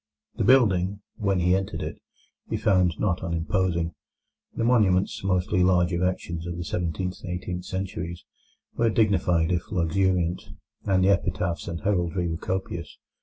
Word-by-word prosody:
The - - -2
building, 100 -6 +4 0.2
when 100 -4 +1
he 90 +1 +3
entered 95 0 -2
it, - - -6 0.5
he - - -1
found 90 -5 +2
not 90 -3 0
unimposing. 85 0 0 0.6
The - - -1
monuments, 105 -8 +2
mostly 90 -1 +1
large 90 -1 +3
erections 85 -1 -2
of 85 0 -4
the 85 - -3
seventeenth 90 +2 -3
and 95 - -5
eighteenth 90 0 -5
centuries, 90 -3 -5 0.5
were 115 -1 +2
dignified 90 -6 +2
if 90 +2 -2
luxuriant, 90 -1 +1 0.4
and 95 -2 +3
the 95 - +4
epitaphs 85 -3 0
and 85 -2 -4
heraldry 90 -1 0
were 80 -1 -2
copious. 85 -3 -4
90 Hz, 145 wpm, -26 LUFS, 85-95 Hz, 0.6 s, building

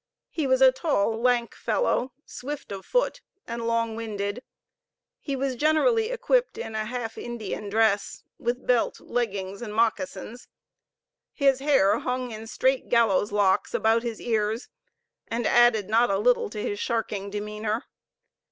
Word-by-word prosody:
He 310 -4 -1
was 260 0 +4
a 260 - +8
tall, 245 -6 0
lank 245 -1 +2
fellow, 265 - 0
swift 290 0 -7
of 195 -1 -7
foot, - - 0 0.2
and 235 0 -4
long 230 -1 0
winded. 210 0 -4 0.8
He 280 - -3
was 270 0 -1
generally 440 - +3
equipped - - +1
in 450 - -5
a 215 0 -2
half 235 -1 -5
Indian 215 -3 -5
dress, 215 -1 +1 0.2
with 240 +2 -2
belt, 245 -2 +1
leggings, 200 -4 -3
and 215 -3 -6
moccasins. 235 +1 -1 0.9
His 275 -3 +3
hair 250 -7 +3
hung 250 -1 -3
in 220 0 -8
straight 260 +3 0
gallows 220 -4 +3
locks 200 -2 +2
about 225 +1 +3
his 230 -2 -4
ears, 220 0 -1 0.6
and 230 0 -2
added 235 -5 +4
not 230 +3 +3
a 195 - +2
little 245 +3 +2
to 210 - -6
his 205 0 -3
sharking 210 -4 -2
demeanor. 210 +2 -3
230 Hz, 145 wpm, -26 LUFS, 210-255 Hz, 0.9 s, a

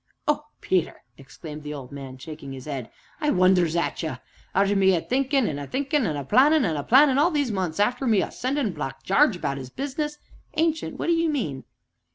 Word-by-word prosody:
"Oh, 300 0 +1 0.2
Peter!" 185 -3 -1
exclaimed 150 +3 -10
the 150 0 -6
old 135 -3 -9
man, 135 -2 -8
shaking 140 0 -8
his 130 -1 -9
head, 135 -6 -5 0.3
"I 300 - 0
wonders 180 - +3
at 170 - -1
ye; 160 -5 -3 0.4
arter 200 +1 +3
me 190 -1 +4
a 165 - 0
thinkin' 270 - +1
an' 145 -2 -3
a 140 - -6
thinkin', 280 -2 0
an' 155 - -2
a 140 - -3
plannin' 280 - +5
an' 165 - 0
a 145 - -1
plannin' 270 - +5
all 320 +4 +5
these 290 -7 0
months 185 -5 -2
arter 245 +5 +1
me 215 -4 +4
a - - -5
sendin' 255 -5 -1
Black 135 -2 -6
Jarge 230 +3 +4
about 140 -5 -3
'is 130 -1 -8
business 295 - -4 0.2
" - - -34
"Ancient, 320 0 0
what - - -3
do 340 - +3
you 330 0 +2
mean?" 155 - -3
195 Hz, 215 wpm, -25 LUFS, -, 0.4 s, plannin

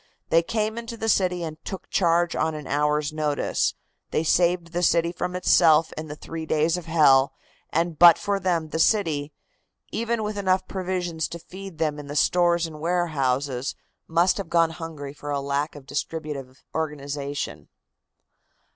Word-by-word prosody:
They 165 - +5
came 215 +5 -2
into 230 0 -7
the 225 - -3
city 180 -4 +2
and 155 -1 -7
took 190 - -7
charge 170 -1 +2
on 160 0 0
an 150 -2 -7
hour's 150 +2 0
notice, 150 -2 0 0.3
they 155 - 0
saved 170 +1 +2
the 175 - 0
city 170 -1 +3
from 180 +1 -4
itself 165 -3 +4
in 155 0 -6
the 150 - -7
three 160 +1 -7
days 155 +2 +2
of 175 -2 -6
hell, 140 -5 +5 0.4
and 165 -1 -1
but 170 -2 +9
for 200 -1 -1
them 170 -4 0
the 160 - -3
city, 160 -7 +2 0.6
even 230 0 -1
with 210 -1 -3
enough 185 -1 +1
provisions 180 -4 -2
to 170 - -7
feed 190 +1 -10
them 155 -2 -1
in 145 - -8
the 145 - -6
stores 175 +2 +3
and 155 -2 -8
warehouses, 140 -6 0 0.3
must 170 +3 +3
have 200 - -5
gone 165 -1 +3
hungry 160 -4 -7
for 145 -1 -4
lack 140 +2 -2
of 145 -2 -11
distributive 145 -3 -5
organization." 145 -2 -4
165 Hz, 165 wpm, -25 LUFS, 150-180 Hz, 0.6 s, but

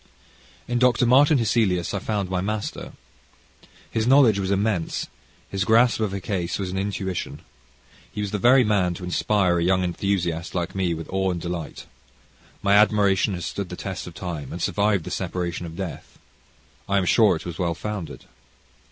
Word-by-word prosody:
In 120 0 0
Dr. 125 -1 +3
Martin 140 +5 +5
Hesselius, 105 -7 +1
I 100 - -1
found 100 -1 -2
my 90 0 -1
master. 105 +2 -4 1.0
His 110 0 0
knowledge 125 -6 +5
was 95 -1 -2
immense, 100 -3 0 0.4
his 95 0 -2
grasp 115 +4 +4
of 110 -3 0
a 100 - -3
case 90 -2 -2
was 95 -2 -3
an 95 - -4
intuition. 95 -2 -4 0.7
He 105 - -5
was 100 -1 -3
the 105 - -2
very 125 +4 +6
man 95 -5 +1
to 90 - -9
inspire 90 0 +1
a - - 0
young 95 +1 +2
enthusiast, 90 -2 -2
like 85 -1 -2
me, 90 -3 0
with 80 0 -7
awe 95 0 0
and 90 -2 -2
delight. 85 -2 -6 0.8
My 100 0 +3
admiration 100 -2 +3
has 85 -2 -5
stood 100 +2 -4
the 90 - -6
test 95 0 -6
of 85 - -10
time 85 -7 -6
and - - -6
survived 100 -3 +1
the 90 - -7
separation 90 -1 -3
of 80 - -9
death. 95 -1 -7 0.7
I 100 - +2
am 95 - +1
sure 105 0 +4
it 80 - -7
was 85 -2 -6
well 85 -2 0
founded. 105 -6 -6
95 Hz, 180 wpm, -24 LUFS, 90-105 Hz, 1.0 s, very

